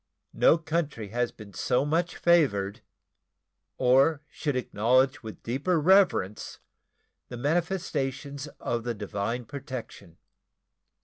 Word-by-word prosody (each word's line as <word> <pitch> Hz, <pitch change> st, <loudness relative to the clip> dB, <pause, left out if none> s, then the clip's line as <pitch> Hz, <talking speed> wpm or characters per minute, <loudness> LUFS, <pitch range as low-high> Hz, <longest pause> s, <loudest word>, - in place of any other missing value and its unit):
No -, -, +5 dB
country 160 Hz, -9 st, -3 dB
has 120 Hz, +2 st, -1 dB
been 105 Hz, -3 st, -13 dB
so 125 Hz, +9 st, +1 dB
much 165 Hz, +3 st, 0 dB
favored, 105 Hz, -, +2 dB, 1.0 s
or 135 Hz, +4 st, +4 dB
should 145 Hz, -3 st, -3 dB
acknowledge 130 Hz, +4 st, +2 dB
with 110 Hz, -2 st, -10 dB
deeper 145 Hz, +9 st, 0 dB
reverence 170 Hz, -, +2 dB, 0.7 s
the 125 Hz, -, -6 dB
manifestations 145 Hz, -3 st, -2 dB
of 120 Hz, -1 st, -2 dB
the 120 Hz, -1 st, -3 dB
divine 105 Hz, +4 st, -3 dB
protection. 130 Hz, -, -8 dB
130 Hz, 105 wpm, -27 LUFS, 115-155 Hz, 1.0 s, No